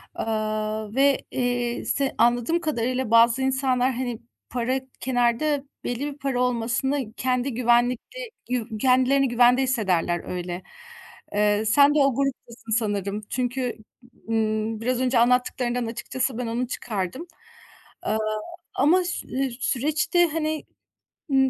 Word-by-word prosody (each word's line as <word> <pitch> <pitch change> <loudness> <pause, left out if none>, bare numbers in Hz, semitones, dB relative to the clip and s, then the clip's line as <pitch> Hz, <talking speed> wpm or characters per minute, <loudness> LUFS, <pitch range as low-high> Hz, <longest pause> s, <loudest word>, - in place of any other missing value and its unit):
Aaa, 215 0 -2
ve, 275 0 +4
eee, 245 -1 -1
se 275 -1 -1
anladığım 240 +8 +3
kadarıyla 255 -5 -1
bazı 230 +2 +5
insanlar, 260 -1 +1
hani, 245 -2 -3 0.3
para 250 +2 0 0.2
kenarda 260 +3 +1 0.2
belli 245 0 -3
bir 280 - -19
para 270 -3 -1
olmasını 245 +1 0
kendi 250 +1 -1
güvenlikli 245 - +1 0.2
yuv 230 -3 -2
kendilerini 260 +2 +4
güvende 245 +2 +5
hissederler 190 -9 0
öyle. 180 0 -5 0.7
Eee, 210 +1 +2
sen 280 +7 +5
de - - +4
o 275 -3 +3
gruptasın 255 -4 -3
sanırım 205 -2 -1
çünkü, 250 -1 -2 0.5
ımm, 220 0 0
biraz 250 +1 0
önce 250 -2 +2
anlattıklarından 245 0 +1
açıkçası 245 +2 -3
ben 250 - -3
onu 235 +2 -1
çıkardım. 225 - -4 0.7
Aaa, 220 - 0 0.6
ama 340 +7 +4
ş 355 - -4
eee, 265 -1 -1
süreçte, 300 +6 +2
hani, 310 0 -2 0.7
ımm, 265 -1 +4
245 Hz, 125 wpm, -24 LUFS, 225-265 Hz, 0.7 s, bazı